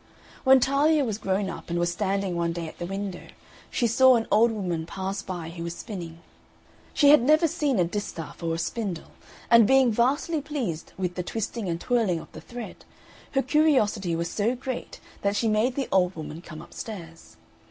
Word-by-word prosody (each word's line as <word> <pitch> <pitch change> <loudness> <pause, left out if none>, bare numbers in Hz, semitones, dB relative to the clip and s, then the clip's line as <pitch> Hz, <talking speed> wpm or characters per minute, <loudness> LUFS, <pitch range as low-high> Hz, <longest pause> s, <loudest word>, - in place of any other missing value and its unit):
When 265 0 +7
Talia 285 +3 +3
was 215 -3 -3
grown 195 -1 0
up, - - -7
and 170 - -1
was 175 0 +1
standing 195 0 -1
one 170 0 0
day 165 -1 -4
at - - -11
the 175 - -4
window, 195 -1 -5 0.4
she 240 - 0
saw 255 +3 +6
an 225 -1 0
old 230 +2 +5
woman 175 -7 -3
pass 195 +2 -4
by 175 -3 -6
who 170 0 -7
was 170 0 -4
spinning. 170 -7 -7 0.7
She 285 - +4
had 300 - +7
never 310 +6 +4
seen 285 -4 0
a 180 - +4
distaff 170 -4 -5
or 165 -1 -1
a - - -3
spindle, 185 -2 -4 0.4
and 230 -3 +7
being 265 -1 +5
vastly 280 +8 +1
pleased 245 - -4
with 180 -2 -2
the 180 - -3
twisting 220 +1 -4
and 170 0 -2
twirling 220 -6 +1
of - - -12
the - - -10
thread, 240 -1 -9 0.5
her 270 -1 +2
curiosity 235 - +2
was 170 +1 -2
so 220 +7 0
great 255 0 -6 0.2
that 200 0 0
she 225 - +1
made 220 +4 +2
the 275 -3 -1
old 185 -1 +2
woman 155 0 -7
come 155 -3 -10
upstairs. 170 -7 -9
205 Hz, 195 wpm, -26 LUFS, 175-245 Hz, 0.7 s, When